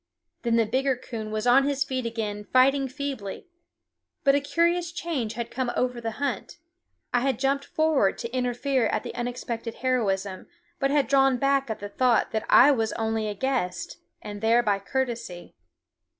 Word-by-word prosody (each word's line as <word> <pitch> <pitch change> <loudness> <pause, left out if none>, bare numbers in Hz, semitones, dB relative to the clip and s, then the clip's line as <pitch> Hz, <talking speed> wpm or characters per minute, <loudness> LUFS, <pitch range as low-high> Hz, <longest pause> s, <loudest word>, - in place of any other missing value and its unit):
Then 235 -1 +1
the 230 -1 +3
bigger 265 +4 +1
coon 230 -3 -7
was 215 +1 -3
on 250 +3 +6
his 280 -1 +1
feet 260 -3 -3
again 210 -3 -4
fighting 270 +2 +4
feebly. 265 -7 -5 0.8
But 275 - +5
a 285 - +4
curious 335 +4 +1
change 295 -11 -3
had 235 +1 -5
come 255 -1 -2
over 250 -1 -1
the 225 -1 -3
hunt. 280 - -3 0.6
I 245 - +4
had 265 -2 0
jumped 275 +2 0
forward 315 -11 +1
to 235 +1 -6
interfere 250 0 0
at - - -1
the - - -6
unexpected 240 -1 -4
heroism, 200 -7 -1 0.3
but 275 -2 +1
had 285 -1 +2
drawn 270 -2 +4
back 275 0 +1
at 220 - -2
the 205 - -4
thought 245 +1 +2
that 220 - -2
I 280 +4 +8
was 225 -5 0
only 220 -1 -1
a 210 - -3
guest, 265 - -2 0.2
and 205 -1 -7
there 230 +2 +4
by 205 -3 +1
courtesy. 235 -5 -4
250 Hz, 175 wpm, -26 LUFS, 225-275 Hz, 0.8 s, I